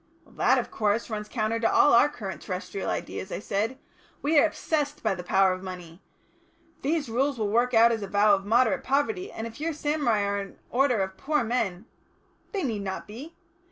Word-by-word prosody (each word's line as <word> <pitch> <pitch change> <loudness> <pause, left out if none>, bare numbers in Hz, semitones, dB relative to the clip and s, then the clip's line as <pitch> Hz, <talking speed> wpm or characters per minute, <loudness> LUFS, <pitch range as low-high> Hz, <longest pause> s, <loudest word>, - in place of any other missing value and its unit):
"That, - - +3
of - - -2
course, 215 +2 0
runs 210 -1 -4
counter 225 -1 -1
to 225 - +2
all 290 - +5
our 235 +5 +6
current 195 - -7
terrestrial 190 +1 -4
ideas," 190 - -4
I - - -2
said. 210 +5 -2 0.5
"We 295 +1 +4
are 325 - +5
obsessed 295 -2 -2
by 220 - +2
the 180 - -6
power 190 +1 +3
of 185 - -6
money. 180 -2 -9 0.8
These 300 +1 0
rules 265 +4 0
will 210 -2 -1
work 240 +2 +2
out 230 +1 +7
as 225 -2 -1
a 200 - -4
vow 205 +1 +4
of 195 -1 +1
moderate 225 +1 +2
poverty, 365 +9 0
and 225 - -6
if 230 +4 -9
your 325 +1 -1
samurai 290 -8 0
are 200 0 -1
an 195 0 -8
order 250 -4 +2
of 190 0 -6
poor 300 -2 0
men 220 -5 -2 0.3
" - - -38
"They 395 -4 -2
need 225 -6 -2
not 190 -1 -4
be. 260 +11 -10
225 Hz, 205 wpm, -27 LUFS, 200-275 Hz, 0.8 s, out